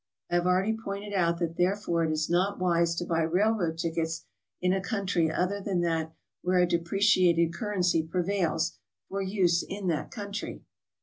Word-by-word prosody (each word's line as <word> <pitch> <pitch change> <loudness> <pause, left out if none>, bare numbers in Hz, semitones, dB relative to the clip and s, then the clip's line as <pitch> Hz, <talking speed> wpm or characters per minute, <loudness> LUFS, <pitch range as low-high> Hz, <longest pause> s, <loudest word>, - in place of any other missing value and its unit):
I - - -4
have 175 +1 +1
already 190 +5 +2
pointed 205 -2 -6
out 170 -3 +2
that 170 -1 -3
therefore 180 -2 +1
it 160 - 0
is 155 0 0
not 185 +4 +1
wise 170 -2 +2
to 175 - -2
buy 165 -1 +1
railroad 175 0 +1
tickets 165 -1 -2 0.3
in 180 0 +2
a 190 - 0
country 195 -6 0
other 190 +4 -1
than 190 -3 -1
that 165 -2 0 0.3
where 180 +1 +1
a 180 - +5
depreci 180 +3 +3
ated 170 -1 +3
currency 180 -4 +1
prevails, 170 0 -1 0.3
for 195 0 -2
use 185 -3 +2
in 195 -2 -4
that 155 -3 -1
country. 205 -2 -6
180 Hz, 175 wpm, -28 LUFS, 170-200 Hz, 0.3 s, a